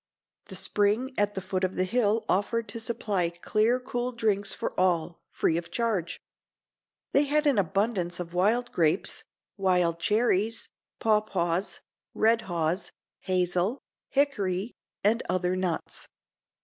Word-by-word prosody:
The - - -9
spring 215 +6 +1
at 205 0 +1
the 190 - -2
foot 185 0 -2
of 185 0 0
the 185 - +1
hill 220 +2 +1
offered 225 +4 0
to 230 - -5
supply 210 -6 -1
clear 215 +8 +1
cool 250 -1 -3
drinks 205 -4 +1
for - - -2
all, 175 -2 +1
free 160 - +1
of 170 0 -4
charge. 200 -4 -1 0.9
They 285 +1 +5
had 300 +2 +1
an 275 -7 +4
abundance 195 -1 0
of 175 -1 -6
wild 225 +7 +2
grapes, 165 +2 +1 0.3
wild 180 -3 +2
cherries, 220 +2 +1 0.3
pawpaws, 200 -4 0 0.3
red 225 +1 +3
haws, 170 +2 -1 0.3
hazel, 185 +4 0 0.3
hickory 210 -7 0 0.3
and 220 +4 +3
other 180 0 +1
nuts. 185 -3 -3
200 Hz, 130 wpm, -28 LUFS, 180-230 Hz, 0.9 s, They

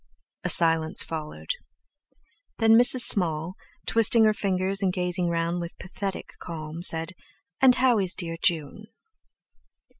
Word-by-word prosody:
A - - -4
silence 165 -1 +3
followed. 155 - -8 1.1
Then 225 -1 +1
Mrs. 245 +2 +5
Small, 165 -5 +3 0.3
twisting 230 0 +2
her 215 -1 +2
fingers 195 -1 -3
and 190 -2 -1
gazing 180 -1 -4
round 170 +1 -4
with 170 0 -10
"pathetic 190 +1 -8
calm", 160 -2 -9
asked: 165 0 +5 0.5
"And 260 -2 +4
how 250 -4 0
is 190 -1 -3
dear 165 -2 -7
June?" 170 +5 -3
180 Hz, 125 wpm, -23 LUFS, 165-210 Hz, 1.1 s, Mrs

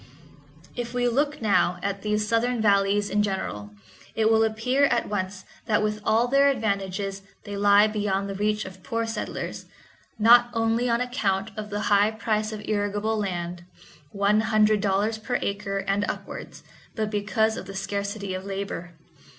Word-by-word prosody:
If 240 0 -5
we 245 0 +2
look 285 +2 0
now 195 -4 +2
at 200 0 -2
these 210 0 0
southern 230 +2 +1
valleys 200 -1 +3
in 210 0 +1
general, 190 - -3 0.5
it 220 0 +3
will 225 0 +5
appear 225 +6 +2
at 240 -3 +1
once 190 -1 -4 0.2
that 215 -1 +2
with 210 0 -1
all 230 +4 +3
their 275 +2 +4
advantages 200 -4 -2 0.2
they 205 - -6
lie 205 +1 +5
beyond 205 -2 -1
the 195 - -4
reach 210 +2 -1
of 190 0 -10
poor 230 +3 -2
settlers, 225 0 -5 0.5
not 240 +2 +6
only 230 +2 +1
on 235 +1 +2
account 215 -5 -1
of 215 -1 -6
the 205 0 -3
high 205 0 +4
price 215 -1 -1
of 215 -1 -6
irrigable 210 +1 -1
land—one 180 +1 -3
hundred 215 -1 +3
dollars 205 +2 0
per 245 +3 -1
acre 200 0 -3
and 195 +1 0
upwards—but 215 -1 -7
because 215 +1 +1
of - - -7
the 195 - -8
scarcity 200 0 -3
of 185 0 -4
labor. 195 -3 -5
210 Hz, 160 wpm, -25 LUFS, 195-220 Hz, 0.5 s, not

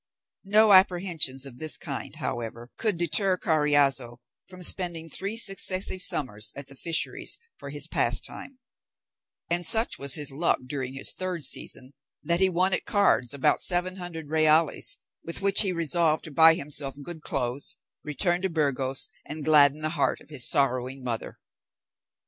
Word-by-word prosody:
No 210 +1 +5
apprehensions 175 -8 +2
of 125 -3 -9
this 155 -1 0
kind, - - -6
however, 120 +1 -6
could 215 -6 0
deter 185 +3 +3
Carriazo 145 -7 +1 0.3
from 185 -1 -11
spending 170 -2 +1
three 200 +7 -2
successive 190 -3 0
summers 110 - -1
at 140 - -8
the 135 - -14
fisheries 165 +4 -1 0.2
for - - -8
his - - -3
pastime; 275 - 0 0.9
and 175 +1 -1
such 225 +6 +2
was 140 -1 -1
his 145 -3 -1
luck 160 +5 +1
during 130 -1 -5
his 135 - -2
third 180 -5 -4
season, 130 +1 -1 0.3
that 170 0 +2
he 190 0 +4
won 185 +2 +1
at - - -1
cards 200 - +2
about 140 -2 +1
seven 185 +1 0
hundred 165 -4 -8
reals, 155 0 +2 0.3
with 170 +3 -5
which 200 0 +6
he 195 - +1
resolved 165 -2 +1
to 155 - -7
buy 160 +2 +6
himself 145 -3 -2
good 165 +1 -4
clothes, 130 -1 -4 0.3
return 175 +4 -1
to 190 - -1
Burgos, 140 -4 -1 0.2
and 150 -1 -8
gladden 150 -1 +5
the 155 - -1
heart 155 -3 -1
of - - -19
his 145 -5 -1
sorrowing 130 -2 0
mother. 120 -3 -5
155 Hz, 155 wpm, -26 LUFS, 135-180 Hz, 0.9 s, which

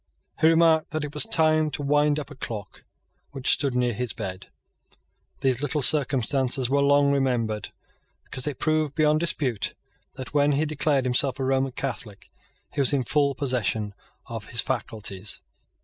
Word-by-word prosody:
He 160 - +5
remarked 165 -1 +4
that 155 -1 -3
it 150 -1 -6
was 150 - +2
time 155 -1 +3
to 145 0 -4
wind 145 +1 +2
up 150 -1 -6
a - - -9
clock 110 -6 -7 0.5
which 135 -2 +1
stood 140 -4 -1
near 125 -1 +1
his 120 -1 -3
bed. 95 -1 -6 0.9
These 130 -1 +1
little 145 0 -1
circumstances 130 -2 +2
were 140 0 +3
long 140 0 +4
remembered 120 -6 -1 0.5
because 130 - -2
they 145 -1 -3
proved 155 +1 0
beyond 155 -1 +3
dispute 135 - -2 0.4
that, 130 -1 -8
when 145 0 +3
he 150 +3 +1
declared 150 -3 0
himself 130 +1 +1
a - - -1
Roman 135 0 0
Catholic, 125 -6 -6 0.4
he 145 - 0
was 135 - +2
in 135 -2 +1
full 140 +1 +1
possession 115 -6 -1 0.3
of 115 -2 -7
his 115 -2 +4
faculties. 110 -5 -3
135 Hz, 165 wpm, -25 LUFS, 125-150 Hz, 0.9 s, He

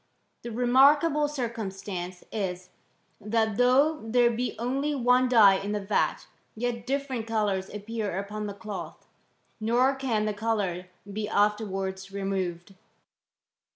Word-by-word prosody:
The 235 - -6
remarkable 285 +6 +4
circumstance 195 -9 -5
is, 185 -3 -4 0.5
thai 220 +1 +1
though 260 +7 +3
there 235 +1 +3
be 245 +2 -2
only 275 +5 -1
one 250 0 +3
dye 215 -5 +7
in 200 +2 -4
the 210 - -1
vat, 200 +1 0 0.3
yet 235 +1 -3
dif 280 +1 -1
ferent 240 -4 -4
colours 205 -4 0
appear 210 -2 -4
upon 210 +2 -4
the 200 - -6
cloth; 205 -1 -7 0.5
nor 240 +5 +3
can 250 -6 -1
the 215 - -1
colour 205 -5 -2 0.3
be 210 0 -3
afterwards 195 -2 -1
removed." 195 -2 -3
220 Hz, 125 wpm, -27 LUFS, 200-245 Hz, 0.5 s, dye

